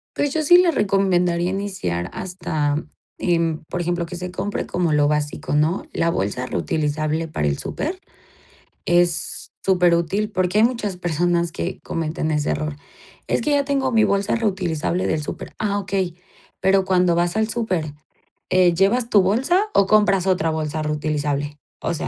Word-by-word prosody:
Pues, 290 -1 0
yo 315 - +1
sí 350 +4 +7
les 355 -3 +4
recomendaría 180 -3 +2
iniciar 190 - -3
hasta, 155 -6 -2 0.4
em, 165 -2 0
por 180 - -3
ejemplo, 175 0 -1
que 175 - -7
se 180 +1 -5
compre 205 +2 -3
como 175 -3 0
lo 150 -1 +3
básico, 150 -1 -1
¿no? 155 +5 +1
La 170 - +1
bolsa 115 - -2
reutilizable 155 +3 -1
para 75 - -2
el 70 -1 0
súper 360 +5 -4 0.9
es 175 +3 +1
superútil 180 +3 +2
porque 185 +2 +1
hay - - +5
muchas 230 -5 0
personas 175 0 0
que 180 +3 -4
cometen 160 -1 -2
ese 150 0 0
error. 155 -1 -3 0.5
Es - - +1
que 300 - 0
ya 285 -1 +2
tengo 275 -2 0
mi 225 -2 +4
bolsa 200 +2 +1
reutilizable 185 -5 -1
del 160 - 0
súper. - - -7
Ah, 205 -1 0
okey. 190 -3 -2 0.5
Pero 190 0 +3
cuando 180 -2 +3
vas 175 0 +1
al 220 0 +1
súper, 185 -10 -2 0.6
eh, 185 -1 +4
¿llevas 215 +7 +2
tu 205 - +5
bolsa 265 - +2
o 195 - +4
compras 200 -3 +3
otra 170 -4 +2
bolsa 155 0 -2
reutilizable? 150 -1 -2 0.2
O 170 - -1
sea, 155 - -3
175 Hz, 165 wpm, -22 LUFS, 155-200 Hz, 0.9 s, sí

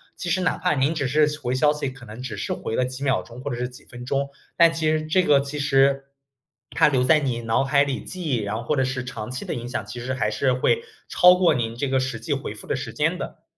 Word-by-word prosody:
其 - - -6
实 185 - +1
哪 180 - +1
怕 180 -3 +1
您 140 +4 +1
只 140 -4 -1
是 150 +3 +3
回 125 -3 -2
消 150 +3 +4
息， 150 -2 -3
可 130 -1 -9
能 110 +2 -10
只 120 -5 -5
是 100 - -4
回 110 - -4
了 - - +2
几 130 +2 -5
秒 135 -2 +2
钟 120 +1 -12
或 145 - -4
者 120 - -3
是 125 0 -2
几 125 - -15
分 120 0 -10
钟， 140 +1 -1 0.3
但 170 -1 +6
其 160 -1 0
实 155 0 0
这 175 +4 +3
个 145 -6 +4
其 140 +2 -4
实 135 -1 +3 0.7
它 160 - +4
留 130 -4 +2
在 155 +4 +5
你 125 -5 -2
脑 115 +3 +1
海 140 +1 +3
里 140 -2 -3
记 185 -1 -7
忆， 135 -7 0
然 105 0 -3
后 115 - -4
或 150 - 0
者 135 - +2
是 130 -1 -2
长 125 -3 -6
期 125 - -5
的 - - -3
影 120 0 -5
响， 125 - -3
其 125 - -8
实 130 +2 -3
还 110 -4 0
是 130 +4 +1
会 130 - +2 0.3
超 180 0 +6
过 180 -3 +4
您 115 -3 -2
这 135 +4 -2
个 130 0 +1
实 130 -3 -3
际 - - -2
回 - - -4
复 - - -11
的 - - -1
时 - - -5
间 - - 0
的。 - - -7
135 Hz, 305 characters per minute, -24 LUFS, 125-150 Hz, 0.7 s, 但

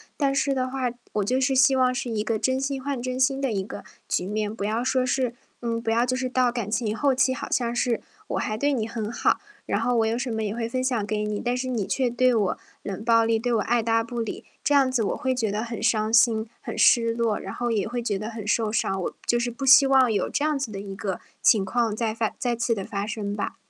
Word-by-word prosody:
但 275 -2 +1
是 275 0 +1
的 255 -1 -1
话， 260 -2 -1 0.2
我 210 - +1
就 255 +4 +1
是 265 +1 +2
希 265 +1 +5
望 255 -1 +3
是 250 -1 -3
一 215 -2 -1
个 220 -1 -1
真 260 +4 +1
心 270 -1 -2
换 275 -2 -3
真 255 +1 -3
心 270 +1 +2
的 265 -4 0
一 195 -2 0
个 - - -8 0.2
局 180 - 0
面， 210 +1 -2
不 200 - -5
要 220 +3 0
说 255 0 +1
是 250 -2 0 0.3
嗯， 230 -1 -2
不 225 -1 -1
要 235 +2 +3
就 255 0 0
是 255 0 -2
到 250 -1 +2
感 235 -4 -4
情 220 -2 0
后 275 +4 +2
期 260 0 +2
好 - - -6
像 240 -1 0
是， 240 -2 +1 0.3
我 - - -2
还 215 0 -2
对 285 +4 +1
你 225 -5 -1
很 225 -1 -4
好， - - +1 0.3
然 205 - -1
后 245 0 +1
我 225 - +3
有 225 +2 0
什 250 -1 -3
么 220 0 -2
也 210 +1 -2
会 230 -1 -2
分 255 +1 -1
享 240 -5 0
给 210 0 -1
你， 210 -1 -3
但 245 +1 0
是 255 0 -3
你 230 -6 -1
却 250 +4 0
对 255 +1 +3
我 205 -5 +1 0.3
冷 200 +2 -5
暴 230 -1 +4
力， 225 0 +2
对 240 +1 -1
我 220 - +2
爱 235 +2 +1
搭 225 0 +2
不 235 0 -5
理， 225 - -4 0.2
这 290 - +2
样 265 -2 +4
子 245 -3 +1
我 200 - 0
会 260 -2 0
觉 230 -4 -1
得 210 +2 -2
很 230 -1 -5
伤 215 0 +1
心、 230 -2 +4
很 - - -7
失 230 -2 +5
落， 230 -2 0
然 195 - -7
后 240 -1 -2
也 210 -3 0
会 240 +1 -3
觉 205 -4 -1
得 215 +1 -4
很 220 -3 -7
受 220 0 +1
伤。 195 -3 -1
我 - - -3
就 240 - +2
是 240 0 -1
不 255 +3 -5
希 270 +1 +8
望 260 -3 +5
有 205 - 0
这 290 - -1
样 300 -2 +1
子 260 -5 -3
的 195 -2 -6
一 195 -1 -7
个 195 -3 -3 0.2
情 210 -4 +5
况 225 +1 0
再 220 -1 -1
发 225 -1 -1
再 240 -3 -1
次 235 -1 +1
的 195 - -4
发 200 +1 -4
生 210 -2 -3
吧。 205 - -3
235 Hz, 295 characters per minute, -25 LUFS, 215-255 Hz, 0.3 s, 希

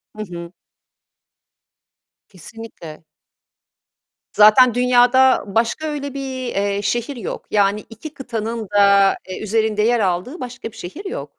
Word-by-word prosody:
Hı 215 - -5
hı. 170 0 -8 1.8
Kesinlikle. 185 -4 -12 1.3
Zaten 215 +4 +6
dünyada 250 +1 +4
başka 230 +9 -1
öyle 285 -2 -5
bir, 265 -2 -5
eee, 200 0 -1
şehir 240 +6 -2
yok. 230 -6 -6
Yani, 205 0 +1
2 235 +7 -10
kıtanın 230 -4 -5
da, 200 -1 +4
eee, 185 - -6
üzerinde 215 0 0
yer 235 +2 +2
aldığı 195 - -2
başka 245 -2 -7
bir - - -17
şehir 295 - -9
yok. 390 - -6
225 Hz, 120 wpm, -19 LUFS, 200-255 Hz, 1.8 s, Zaten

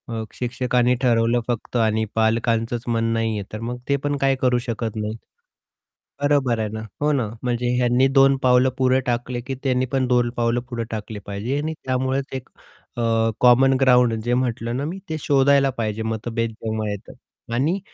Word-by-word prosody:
अ, 115 -1 -3
शिक्षकांनी 125 0 +1
ठरवलं 120 -1 +3
फक्त 120 0 -4
आणि 110 -1 +2
पालकांचंच 115 +1 +1
मन 115 -1 0
नाहीये, 110 -2 -1
तर 110 - -4
मग 120 +2 -4
ते 140 - +4
पण 145 0 +1
काही 135 -1 +2
करू 125 -1 +3
शकत 115 -2 -4
नाहीत. 110 +1 -3 1.0
बरोबर 140 -5 +2
आहे 110 -1 -1
ना 110 - -4 0.2
हो 150 +1 +2
ना, 130 -6 0 0.2
म्हणजे 120 0 -1
ह्यांनी 125 +1 +3
दोन 135 0 +6
पावलं 125 0 +5
पुढे 130 0 +3
टाकले 120 0 -2
की 135 - -3
त्यांनी 130 -1 +1
पण 130 0 -1
दोन 120 -1 +2
पावलं 120 0 +1
पुढे 120 -2 -3
टाकले 110 -1 -5
पाहिजे 105 +7 -3
आणि 155 +2 -2
त्यामुळेच 130 +1 0
एक 130 -1 -6 0.5
अ, - - -1 0.4
कॉमन 125 +2 +5
ग्राऊंड 125 -3 +5
जे 120 +1 0
म्हटलं 120 -1 -1
ना 140 - -2
मी 175 +5 -5
ते 160 - -2
शोधायला 140 0 +4
पाहिजे 110 -1 -2
मतभेद 115 +1 -2
जेव्हा 110 -1 -3
येतात 100 +2 -10
आणि 150 +11 +1
120 Hz, 175 wpm, -22 LUFS, 115-130 Hz, 1.0 s, दोन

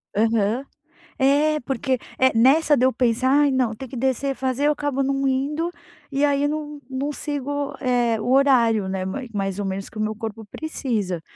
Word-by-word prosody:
Aham. 225 +3 +1 0.5
É, 295 +3 +3
porque, 260 +1 -1 0.2
eh, 260 0 +5
nessa 295 +6 +5
de 255 - +3
eu 260 - +4
pensar: 245 +1 +1
"Ai, 285 +1 +4
não, 250 -4 +1
tem 260 +4 -8
que 255 - -9
descer, 265 +2 0
fazer", 265 +2 -1
eu - - +4
acabo 290 -2 -2
não 275 0 0
indo. 290 +6 0 0.4
E 280 +1 +2
aí 285 0 +2
não 295 -1 -4
não 270 +3 -2
sigo, 285 -1 -3
eh, 240 -3 +1
o 245 +4 -2
horário, 235 -7 +4
né, 190 -1 -2
mai 250 +7 -4
mais 195 -1 -2
ou 200 - -2
menos 195 +1 -4
que - - -13
o 215 - -1
meu 215 0 -1
corpo 220 0 -6
precisa. 215 - -3
260 Hz, 190 wpm, -23 LUFS, 225-280 Hz, 0.5 s, eh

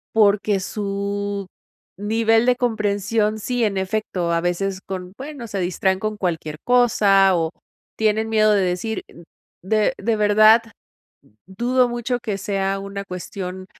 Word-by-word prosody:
Porque 205 -1 +3
su 200 0 -3 0.5
nivel 225 +3 +2
de 250 0 +4
comprensión 215 -2 0
sí, 245 +2 -1
en 205 -3 0
efecto. 190 -3 -2
A 170 - +1
veces 185 +2 -1
con 185 -1 -7
bueno, 275 -3 -7
se 205 -2 -4
distraen 190 +1 0
con 215 0 -3
cualquier 160 -5 -3
cosa, 205 -6 +4
o 165 -2 0 0.5
tienen 220 0 +1
miedo 215 -1 +4
de 200 - +3
decir 185 +4 -2 0.6
de 215 +5 +1
de 225 +3 0
verdad, 215 +2 +6 0.9
dudo 245 +6 +1
mucho 240 +1 -2
que 210 -4 -3
sea 195 0 -1
una 200 0 -6
cuestión 185 0 -6
205 Hz, 135 wpm, -21 LUFS, 190-220 Hz, 0.9 s, verdad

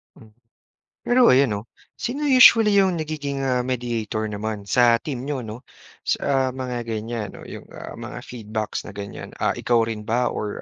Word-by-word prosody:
Hmm. 110 - -17 0.7
Pero 245 0 +5
ayon 135 +1 +5
'no? 100 - -2 0.4
Sino 275 +5 -3
usually 230 -5 +7
'yong 190 -2 +3
nagiging 145 -3 -4
ah, 125 -2 +1
mediator 120 -4 -2
naman 105 0 -4
sa 120 0 +5
team 135 -5 -5
niyo 140 -1 -3
'no, 110 +4 -8 0.4
sa 135 -2 +1
mga 125 -2 -4
ganiyan, 110 -1 -3
'no, - - -11
'yong, - - -9
ah, - - -9
mga - - -7
feedbacks 110 -3 -5
na 105 - -9
ganiyan, 100 0 -7
ah, - - +2
ikaw 120 -2 +2
rin 110 -2 -5
ba 120 +3 +1
or, 105 - -3
125 Hz, 170 wpm, -23 LUFS, 110-140 Hz, 0.7 s, usually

